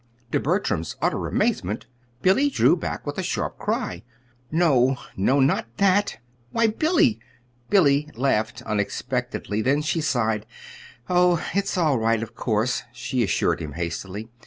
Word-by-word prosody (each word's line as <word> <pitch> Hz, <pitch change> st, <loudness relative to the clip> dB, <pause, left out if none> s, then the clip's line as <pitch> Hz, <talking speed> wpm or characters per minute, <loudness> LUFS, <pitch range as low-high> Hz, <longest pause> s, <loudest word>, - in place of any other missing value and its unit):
To -, -, +2 dB
Bertram's 80 Hz, -1 st, -1 dB
utter -, -, 0 dB
amazement, 105 Hz, +6 st, -1 dB, 0.4 s
Billy 235 Hz, +10 st, +4 dB
drew 270 Hz, -, +4 dB
back 170 Hz, -, -5 dB
with -, -, -4 dB
a -, -, +1 dB
sharp -, -, -3 dB
cry. 90 Hz, 0 st, -2 dB, 0.5 s
"No, 135 Hz, -6 st, +3 dB, 0.2 s
no 130 Hz, +9 st, +2 dB
not 135 Hz, -3 st, +2 dB
that!" 200 Hz, -, +2 dB, 0.3 s
"Why, 230 Hz, -, +2 dB
Billy!" 310 Hz, +2 st, +2 dB, 0.5 s
Billy 150 Hz, -6 st, +4 dB
laughed 115 Hz, -3 st, 0 dB
unexpectedly; 110 Hz, +1 st, -2 dB
then 140 Hz, +6 st, +2 dB
she 160 Hz, +2 st, 0 dB
sighed. 110 Hz, -8 st, 0 dB, 0.6 s
"Oh, 180 Hz, -2 st, +3 dB
it's 195 Hz, -1 st, 0 dB
all 155 Hz, -8 st, +2 dB
right, 115 Hz, 0 st, +1 dB
of 115 Hz, 0 st, -8 dB
course," 115 Hz, +2 st, 0 dB
she 120 Hz, +1 st, -2 dB
assured 110 Hz, -, +1 dB
him 75 Hz, -2 st, -6 dB
hastily. 95 Hz, +7 st, -5 dB
130 Hz, 135 wpm, -24 LUFS, 110-175 Hz, 0.6 s, Billy